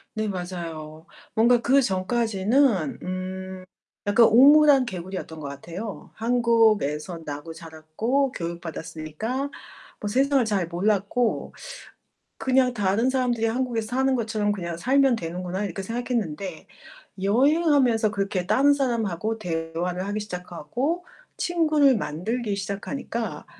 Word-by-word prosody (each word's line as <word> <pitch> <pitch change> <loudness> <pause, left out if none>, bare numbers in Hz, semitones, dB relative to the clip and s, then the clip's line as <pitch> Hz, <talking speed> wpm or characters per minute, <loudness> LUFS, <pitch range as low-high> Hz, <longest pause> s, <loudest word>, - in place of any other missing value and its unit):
네. 215 0 -1
맞아요. 165 -4 -6 0.3
뭔가 235 +2 +4
그 270 +4 +4
전까지는 210 - +1
음 185 0 -5 0.4
약간 215 +3 +6
우물 290 +7 +7
안 270 -3 +5
개구리였던 185 -4 -6
것 145 - -6
같아요. 170 +9 -7
한국에서 220 - +2
나고 145 +2 -6
자랐고 165 - -2
교육받았으니까 170 - -5 0.5
뭐 210 - -3
세상을 270 +3 +3
잘 200 -5 0
몰랐고 205 +6 0 0.9
'그냥 255 -1 +2
다른 210 +3 +1
사람들이 250 -3 +1
한국에서 230 -1 -1
사는 265 0 +2
것처럼 215 -3 0
그냥 170 -4 -4
살면 265 +5 +3
되는구나.' 180 +2 -4
이렇게 195 0 -4
생각했는데 200 -7 -3 0.6
여행하면서 260 - +3
그렇게 195 -3 -2
다른 280 +7 +4
사람하고 225 -5 -1
대화를 175 0 -3
하기 205 +1 -2
시작하고 210 - -4 0.3
친구를 310 -6 +3
만들기 210 +5 -2
시작하니까 205 +4 -4
210 Hz, 300 characters per minute, -25 LUFS, 180-245 Hz, 0.9 s, 우물